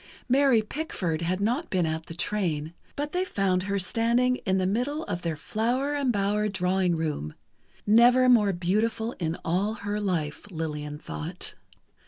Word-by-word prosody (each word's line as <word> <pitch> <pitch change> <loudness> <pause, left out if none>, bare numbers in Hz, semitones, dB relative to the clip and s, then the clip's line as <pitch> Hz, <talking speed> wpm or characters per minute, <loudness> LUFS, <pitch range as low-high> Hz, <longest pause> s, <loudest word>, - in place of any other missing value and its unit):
Mary 260 -3 +4
Pickford 200 - -3
had 180 +3 -1
not 245 +11 0
been 180 -3 +1
at 160 0 -3
the 165 - -8
train, 170 -4 -1 0.2
but 290 +1 -3
they 360 +2 0
found 195 - 0
her 200 +1 -1
standing 235 +6 +2
in 190 0 +3
the 185 - +1
middle 250 +11 -1
of 175 - -4
their 165 -2 -2
"flower 245 - -1
embowered 210 -6 0
drawing 180 -1 +1
room"—never 210 - +1
more 220 -5 +5
beautiful 215 +6 0
in 165 -1 -2
all 195 +6 0
her 205 -1 -3
life, 180 -3 -2
Lillian 150 -4 -4
thought. 75 - -5
200 Hz, 150 wpm, -27 LUFS, 170-235 Hz, 0.2 s, more